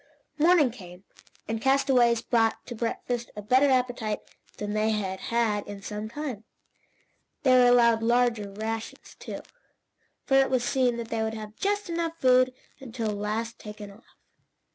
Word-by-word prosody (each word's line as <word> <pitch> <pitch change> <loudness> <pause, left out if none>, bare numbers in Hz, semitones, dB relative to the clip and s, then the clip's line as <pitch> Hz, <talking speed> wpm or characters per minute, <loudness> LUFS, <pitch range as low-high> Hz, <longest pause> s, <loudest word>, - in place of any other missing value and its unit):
Morning 315 -5 +5
came, 180 -5 -12 0.4
and 225 0 -3
castaways 260 -3 +3
brought 225 -2 +1
to 240 - -7
breakfast 235 +1 -3
a 210 - -6
better 260 +6 +4
appetite 245 -4 0 0.4
than 205 0 -4
they 215 +1 +1
had 195 -3 -2
had 225 -3 +1
in 200 -1 -8
some 210 +1 -5
time. 260 -5 -5 1.0
They 260 - +4
were 250 -1 +6
allowed 235 -2 +5
larger 235 -3 +1
rations, 220 +2 -6
too, - - -7 0.8
for 270 - +3
it 270 0 +4
was 255 -2 +1
seen 250 -1 +1
that 230 -1 -6
they 225 - -1
would 220 0 -2
have 215 -1 -8
just 410 - -1
enough 335 -1 -3
food 255 -2 +4 0.3
to - - -14 0.3
last 215 +3 -3
until 210 - -7
taken 210 -1 -10
off. 210 +5 -20
235 Hz, 160 wpm, -27 LUFS, 215-255 Hz, 1.0 s, were